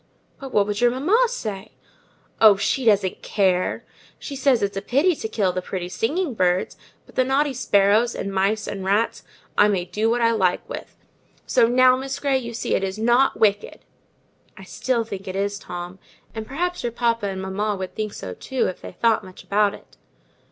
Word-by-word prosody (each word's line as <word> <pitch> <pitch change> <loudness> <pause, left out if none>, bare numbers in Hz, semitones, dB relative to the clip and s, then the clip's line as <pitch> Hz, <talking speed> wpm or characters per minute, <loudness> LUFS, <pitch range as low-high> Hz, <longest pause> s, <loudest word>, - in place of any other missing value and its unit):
"But 270 -2 -8
what 205 -3 +3
would 205 +1 -3
your 245 - +5
mamma 350 - +2
say?" 215 - -6 0.7
"Oh, 215 -2 +8
she 245 +6 -1
doesn't 200 -4 +2
care! 185 -3 0 0.3
she 280 - -7
says 265 -5 +2
it's 200 0 -1
a 195 - -2
pity 305 - +2
to - - -4
kill 205 -4 0
the 185 - -2
pretty 180 -1 -5
singing 285 - -1
birds, 180 -3 0 0.3
but - - -19
the 255 - +2
naughty 275 +2 +1
sparrows, 220 -1 +2
and 195 - -4
mice, 200 +3 0
and 195 -2 -5
rats, 205 +4 0 0.4
I 205 - +7
may 190 -4 0
do 210 +5 -1
what 240 +1 +1
I 230 -1 +3
like 190 -5 0
with. - - -8 0.5
So 240 -3 +3
now, 255 +1 +5
Miss 270 +1 -4
Grey, 275 -2 +1
you 235 -2 -7
see - - -2
it - - +1
is 190 +1 -3
not 240 +4 +2
wicked." 205 -1 +1 0.8
"I 195 - -11
still 240 +5 -1
think 200 -3 -8
it 185 - -5
is, 200 +1 -2
Tom; 175 +1 -7 0.3
and 220 -1 -6
perhaps 355 +6 -2
your 240 - -2
papa 230 -2 0
and 190 -1 -4
mamma 200 +2 -2
would 190 -1 -6
think 215 -1 -4
so 90 - -6
too, 260 - -2
if 185 - -4
they - - -9
thought 225 +3 +2
much 185 -1 -12
about 205 0 +1
it. - - -19
215 Hz, 200 wpm, -23 LUFS, 195-250 Hz, 0.8 s, Oh